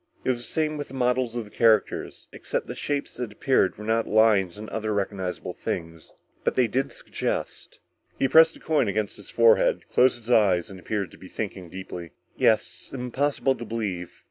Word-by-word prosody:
It - - +3
was 120 - -2
the - - -5
same 155 +4 -1
with 145 - -5
the 135 - -10
models 125 -1 +1
of 120 -2 -3
the 105 - -15
characters, 110 -3 +1
except - - -3
the - - -6
shapes 145 -1 -3
that 120 -3 -4
appeared 105 -2 +1
were 105 - -8
not 115 +1 +1
of - - -7
lions 105 -4 +4
or 110 +1 -7
other 110 -1 -1
recognizable 95 -2 -3
things. 80 -1 -5 0.3
But - - 0
they 125 -2 +4
did 130 +5 -1
suggest." - - -4 0.4
_He 135 - +3
pressed 160 +4 +6
the - - -14
coin 155 -2 +1
against 105 0 -1
his 100 - -10
forehead, 115 -2 +4
closed 125 -1 +4
his 120 0 -12
eyes 100 -5 +3
and 95 - -10
appeared 100 -2 -3
to - - -15
be 95 - -11
thinking 95 -3 -5
deeply. 90 -2 -8 0.2
"Yes, - - +1
impossible 135 +2 0
to 120 - -8
believe. 105 -6 -3
110 Hz, 195 wpm, -26 LUFS, 100-125 Hz, 0.4 s, pressed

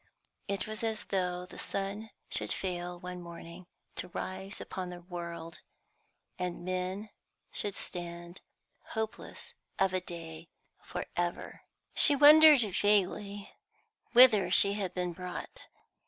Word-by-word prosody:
It 200 -1 -2
was 215 +1 -6
as 220 -2 -2
though 180 -2 -2
the - - -12
sun 200 +3 -4 0.2
should - - -2
fail 175 -1 -3
one 180 0 -7
morning 170 +1 -11 0.3
to - - -1
rise 190 +2 -6
upon 185 -1 -6
the 175 0 -9
world, 170 -2 -7 0.8
and 180 -1 -4
men 185 +3 -3 0.4
should 205 -2 -4
stand 175 0 -7 0.6
hopeless 220 0 -5 0.2
of 195 -1 +2 0.2
day 165 -1 -9 0.3
for - - -5
ever. 175 0 -3 0.3
She 290 - +8
wondered 300 0 +9
vaguely 205 0 0 0.6
whither 230 -7 +7
she 200 +2 +7
had 195 -3 -4
been 180 -1 -2
brought. 180 0 -8
185 Hz, 120 wpm, -31 LUFS, 175-205 Hz, 0.8 s, wondered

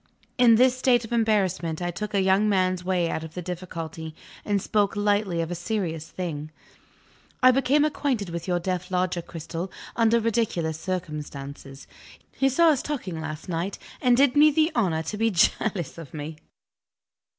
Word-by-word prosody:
In 235 -2 +7
this 255 +2 +4
state 250 -2 +2
of 225 - -12
embarrassment 190 -8 +1
I 175 0 -2
took 210 +4 -5
a 195 - +3
young 190 +3 +3
man's 185 -2 +1
way 180 -2 +1
out 160 - -3
of 160 0 -9
the 180 - -4
difficulty, 165 -3 -6 0.3
and 205 -1 +1
spoke 205 +1 +1
lightly 205 -4 +1
of 165 +1 -4
a - - -1
serious 175 -4 -3
thing. 155 -5 -5 0.9
"I 255 - +9
became 275 +3 +3
acquainted 265 -9 -1
with 170 +1 -5
your 180 -1 +1
deaf 180 +1 -3
Lodger, 180 -1 0
Cristel, 165 +2 -6 0.2
under 230 0 +4
ridiculous 210 -9 -1
circumstances. 145 -6 -6 0.5
He 270 - +1
saw 335 +5 +4
us 290 -5 +2
talking 195 - -4
last 155 +2 -6
night, 180 +3 -3 0.2
and 245 -2 +4
did 275 -1 +4
me 300 +1 +7
the 310 +2 +2
honor 175 -9 +1
to 210 - -5
be 225 +1 +2
jealous 185 -3 +1
of 160 -2 -10
me." 150 +1 -6
185 Hz, 170 wpm, -25 LUFS, 165-225 Hz, 0.9 s, I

